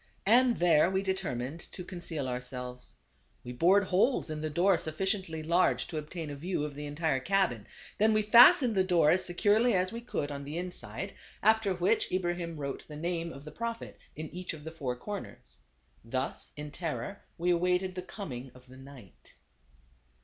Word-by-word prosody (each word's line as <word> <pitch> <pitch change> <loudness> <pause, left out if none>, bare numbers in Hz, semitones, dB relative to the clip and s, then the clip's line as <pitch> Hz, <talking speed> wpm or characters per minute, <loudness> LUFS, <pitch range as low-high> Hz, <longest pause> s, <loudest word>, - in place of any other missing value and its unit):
And 240 +3 +5
there 170 -1 +4
we 190 +1 0
determined 165 -7 -2
to 180 - -6
conceal 170 -6 -4
ourselves. 125 0 -5 0.5
We 120 - -7
bored 180 +10 +4
holes 190 - +1
in 155 0 -4
the 155 - -2
door 175 +3 +3
sufficiently 165 0 -2
large 170 +3 +2
to 155 - -4
obtain 155 0 -6
a - - -5
view 170 +2 -2
of 150 -1 -4
the 145 +1 -6
entire 145 -1 0
cabin, 175 - 0 0.3
then 215 +1 +5
we 215 0 +2
fas 235 +7 +9
tened 245 -4 +1
the 190 -2 +3
door 175 -5 +4
as 185 +1 +2
securely 210 +6 +3
as 185 +1 +1
we 230 - -6
could 150 -11 -3
on 140 0 -5
the 145 +4 -5
inside, 180 0 -5 0.3
after 220 -3 +3
which 180 +6 +1
Ibrahim 175 -2 -2
wrote 140 -2 -5
the 150 - -8
name 170 +1 -2
of 140 - -10
the 155 - -8
Prophet 230 +6 -5 0.2
in 155 +1 -7
each 180 -1 -5
of 150 - -12
the 160 - -6
four 135 -6 -3
corners. 125 - -8 0.4
Thus 130 +3 -3
in 150 0 -6
terror 175 +5 -4 0.2
we 175 +1 +1
awaited 180 +2 +1
the 180 - -4
coming 135 - -7
of 125 0 -16
the 130 0 -14
night. 135 - -14
170 Hz, 185 wpm, -30 LUFS, 145-190 Hz, 0.5 s, fas